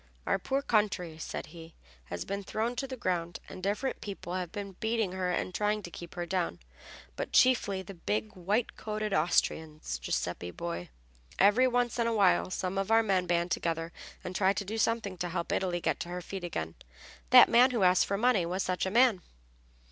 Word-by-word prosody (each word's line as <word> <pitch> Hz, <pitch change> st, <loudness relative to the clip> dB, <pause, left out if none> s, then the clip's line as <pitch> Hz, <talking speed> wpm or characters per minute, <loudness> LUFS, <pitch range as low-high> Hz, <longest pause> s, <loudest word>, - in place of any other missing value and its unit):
"Our -, -, +1 dB
poor 270 Hz, +8 st, -1 dB
country," 195 Hz, -, 0 dB
said -, -, -5 dB
he, 165 Hz, -1 st, -12 dB, 0.3 s
"has 90 Hz, +4 st, -5 dB
been 200 Hz, +1 st, -4 dB
thrown 225 Hz, +5 st, -2 dB
to 270 Hz, -, -2 dB
the 260 Hz, -1 st, -6 dB
ground, 175 Hz, -5 st, -2 dB
and -, -, -9 dB
different 210 Hz, +8 st, -2 dB
people 195 Hz, -3 st, -6 dB
have 180 Hz, -2 st, -3 dB
been 200 Hz, -1 st, -5 dB
beating 220 Hz, -3 st, 0 dB
her 185 Hz, -1 st, -2 dB
and 180 Hz, +1 st, -2 dB
trying 210 Hz, +1 st, 0 dB
to 175 Hz, -, -8 dB
keep 170 Hz, +1 st, -9 dB
her 175 Hz, -1 st, -3 dB
down, 175 Hz, -, -1 dB, 0.6 s
but -, -, -4 dB
chiefly 205 Hz, -7 st, +4 dB
the 195 Hz, -, -9 dB
big, 210 Hz, +4 st, -3 dB
white 200 Hz, +6 st, -1 dB
coated 215 Hz, -1 st, -3 dB
Austrians, 155 Hz, -, 0 dB
Giuseppe 90 Hz, +8 st, -2 dB
boy. 85 Hz, 0 st, -5 dB, 0.5 s
Every 210 Hz, +7 st, +5 dB
once 245 Hz, -1 st, 0 dB
in 230 Hz, -, +2 dB
a 230 Hz, -, 0 dB
while 195 Hz, -4 st, +3 dB
some 185 Hz, +1 st, -2 dB
of 195 Hz, +1 st, -2 dB
our 225 Hz, 0 st, +5 dB
men 190 Hz, -4 st, +1 dB
band 170 Hz, 0 st, +1 dB
together 165 Hz, -1 st, -2 dB, 0.3 s
and 185 Hz, -, -6 dB
try 190 Hz, 0 st, +3 dB
to 200 Hz, +1 st, -3 dB
do 220 Hz, +3 st, -4 dB
something 220 Hz, -5 st, 0 dB
to 175 Hz, -, -2 dB
help 170 Hz, 0 st, -3 dB
Italy 180 Hz, -2 st, 0 dB
get -, -, -1 dB
to 170 Hz, -, -5 dB
her 180 Hz, 0 st, -5 dB
feet 190 Hz, +1 st, -6 dB
again. 80 Hz, -, -4 dB, 0.6 s
That -, -, +9 dB
man 245 Hz, +2 st, +6 dB
who 235 Hz, -6 st, 0 dB
asked 180 Hz, 0 st, +4 dB
for 200 Hz, -, 0 dB
money 225 Hz, -4 st, +3 dB
was 180 Hz, +2 st, -1 dB
such 185 Hz, 0 st, -1 dB
a -, -, 0 dB
man." 230 Hz, -2 st, +4 dB
190 Hz, 200 wpm, -30 LUFS, 175-215 Hz, 0.6 s, That